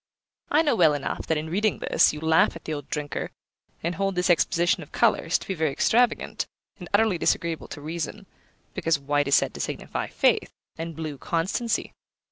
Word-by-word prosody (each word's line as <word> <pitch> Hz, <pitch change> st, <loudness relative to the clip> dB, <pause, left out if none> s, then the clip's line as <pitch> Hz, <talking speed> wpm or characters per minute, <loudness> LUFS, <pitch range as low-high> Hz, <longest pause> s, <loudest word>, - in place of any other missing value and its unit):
I 305 Hz, +3 st, +4 dB
know 290 Hz, -6 st, +2 dB
well 160 Hz, -7 st, +5 dB
enough 145 Hz, -, -4 dB
that, 160 Hz, -, +1 dB
in 155 Hz, +1 st, -4 dB
reading 210 Hz, +3 st, +1 dB
this, -, -, +3 dB
you 150 Hz, -, -7 dB
laugh 160 Hz, +1 st, +3 dB
at 165 Hz, -, -11 dB
the 155 Hz, -, -3 dB
old 145 Hz, -2 st, -6 dB
drinker, 150 Hz, -1 st, -3 dB, 0.5 s
and 170 Hz, +2 st, -1 dB
hold 195 Hz, +2 st, -1 dB
this 180 Hz, +1 st, +2 dB
exposition 175 Hz, 0 st, +2 dB
of -, -, -11 dB
colours -, -, +2 dB
to -, -, -12 dB
be 195 Hz, -, -1 dB
very 160 Hz, -4 st, 0 dB
extravagant, 235 Hz, -, +1 dB, 0.3 s
and 175 Hz, -, -9 dB
utterly 205 Hz, -3 st, +3 dB
disagreeable 165 Hz, -1 st, 0 dB
to 145 Hz, -, -8 dB
reason, 165 Hz, +6 st, -5 dB, 0.5 s
because 165 Hz, -4 st, +1 dB
white 145 Hz, 0 st, 0 dB
is 140 Hz, -, +5 dB
said -, -, +2 dB
to -, -, -9 dB
signify -, -, -3 dB
faith, -, -, +1 dB, 0.2 s
and 165 Hz, 0 st, -6 dB
blue 155 Hz, -3 st, -5 dB
constancy. 185 Hz, -, -1 dB
165 Hz, 190 wpm, -25 LUFS, 155-190 Hz, 0.5 s, well